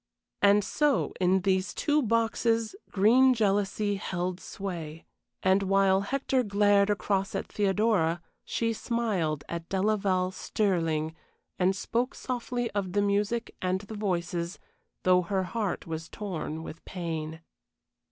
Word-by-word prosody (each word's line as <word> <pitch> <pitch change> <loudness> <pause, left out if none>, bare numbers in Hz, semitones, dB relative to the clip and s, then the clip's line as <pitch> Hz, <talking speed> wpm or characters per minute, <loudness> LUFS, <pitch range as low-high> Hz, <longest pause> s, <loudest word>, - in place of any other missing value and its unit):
And 205 +1 +5
so 295 +4 +1
in 185 +1 +3
these 190 0 0
two 300 0 +2
boxes 230 - +1
green 250 +6 +5
jealousy 205 -1 +1
held 180 -1 -3
sway, 165 -6 -6 0.4
and 190 +1 +4
while 195 0 +3
Hector 265 +4 0
glared 205 -2 +3
across 200 -1 0
at - - -2
Theodora 195 -4 +2 0.2
she 230 0 -1
smiled 205 - -1
at 170 -1 -5
Delaval 195 -2 +1
Stirling, 165 -7 0 0.4
and 185 +1 +3
spoke 240 +6 -1
softly 245 -1 -3
of 195 -3 -2
the 205 0 +2
music 205 +3 0
and 185 +1 0
the 210 +1 -9
voices, 175 -3 -2 0.5
though 180 0 +5
her 190 +2 -1
heart 205 0 -2
was 160 0 -5
torn 160 -6 -5
with 165 - -9
pain. 160 -3 -5
195 Hz, 125 wpm, -28 LUFS, 180-215 Hz, 0.5 s, And